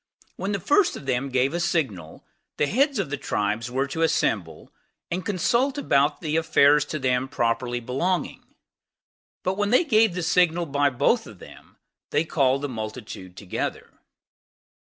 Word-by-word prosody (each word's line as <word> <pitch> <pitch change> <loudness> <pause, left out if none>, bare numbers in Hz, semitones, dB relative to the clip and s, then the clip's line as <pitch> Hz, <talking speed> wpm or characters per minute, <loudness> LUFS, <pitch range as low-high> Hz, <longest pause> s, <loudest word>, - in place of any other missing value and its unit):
When 195 - -3
the 200 - -1
first 340 - +2
of - - -11
them 135 +1 -1
gave 130 +2 +1
a 175 - -1
signal, 115 - -2 0.3
the 150 - +2
heads 270 - +1
of 190 -8 -2
the 145 - -1
tribes 110 -2 -2
were 130 +2 0
to 160 +3 -3
assemble, 95 - -1 0.4
and 180 +2 -2
consult 235 - +1
about 145 - +1
the 155 -1 -1
affairs 150 -2 +4
to - - -4
them 130 -1 0
properly 120 0 -1
belonging; 135 +10 -3 0.9
but 190 +2 -1
when 205 0 +1
they 250 +10 +4
gave 220 - +3
the 180 - -2
signal 175 0 +2
by 145 -1 +1
both 145 - +1
of 105 - -12
them, - - -15 0.3
they 160 - +1
called 140 -3 +1
the - - 0
multitude 110 -5 -7
together. 95 - -4
145 Hz, 160 wpm, -24 LUFS, 125-180 Hz, 0.9 s, affairs